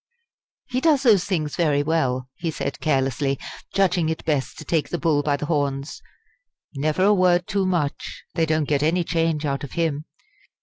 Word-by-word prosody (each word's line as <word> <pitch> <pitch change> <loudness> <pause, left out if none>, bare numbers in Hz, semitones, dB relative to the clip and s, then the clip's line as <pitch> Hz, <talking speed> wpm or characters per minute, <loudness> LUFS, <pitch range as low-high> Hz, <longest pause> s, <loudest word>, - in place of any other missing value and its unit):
"He 255 0 -2
does 300 -4 +3
those 205 -7 +5
things 155 -7 -2
very 150 -4 +2
well," 130 -5 0
he 165 - -4
said 160 - -4
carelessly, 135 -1 0 0.3
judging 180 -4 +2
it 160 - -4
best 145 -4 -1
to 155 - -9
take 155 -1 0
the 175 - -2
bull 160 -4 +2
by 145 -1 0
the 150 - -4
horns. 145 -2 -2 0.7
"Never 155 +5 0
a 205 +2 +5
word 180 -2 +3
too 195 -2 0
much 165 -6 -2
they 165 0 +1
don't 155 -2 +1
get 145 -2 +1
any 170 +4 +2
change 165 -2 0
out 140 -1 -2
of 140 - -7
him. 155 -3 -1
155 Hz, 180 wpm, -23 LUFS, 145-175 Hz, 0.7 s, those